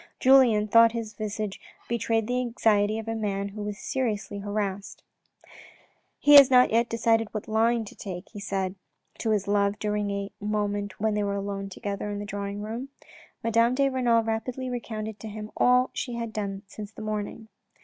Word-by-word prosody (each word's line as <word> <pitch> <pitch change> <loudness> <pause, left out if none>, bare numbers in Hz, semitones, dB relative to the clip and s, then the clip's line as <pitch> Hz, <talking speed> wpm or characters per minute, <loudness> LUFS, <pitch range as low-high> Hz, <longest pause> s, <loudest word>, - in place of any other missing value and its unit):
Julien 250 -5 +5
thought 230 +1 +6
his 225 -2 -4
visage 210 -1 -4 0.3
betrayed 225 -1 0
the 250 +2 0
anxiety 220 -3 +2
of 225 0 -6
a 225 - -1
man 200 -2 -2
who 210 +1 -8
was 205 -1 -4
seriously 215 -6 -2
harassed. 205 -1 -4 0.6
" - - -23 0.3
He 290 - +5
has 275 -2 +9
not 250 -1 +6
yet 230 +1 +2
decided 225 -1 +1
what 215 - -4
line 225 +1 +2
to - - -11
take," 185 -2 -7
he 210 - -9
said 195 -2 -2 0.5
to 225 - -1
his 210 -2 +1
love 200 0 +2
during 210 -1 -1
a 200 0 -3
moment 205 -1 -2
when 220 0 +1
they 210 - 0
were 200 0 -1
alone 200 0 -4
together 200 +1 -4
in 205 - -3
the 205 - -5
drawing 200 0 -5
room. 230 +5 -5 0.5
Madame 230 +2 +3
de 275 0 +3
Renal 240 -3 +2
rapidly 245 +3 -3
recounted 220 -3 -5
to 220 - -8
him 210 0 -7
all 250 +1 +4
she 245 -2 -4
had 230 -1 -4
done 200 -1 -4
since 205 +1 -9
the 220 - -9
morning. 215 +1 -4
215 Hz, 185 wpm, -26 LUFS, 205-230 Hz, 0.6 s, has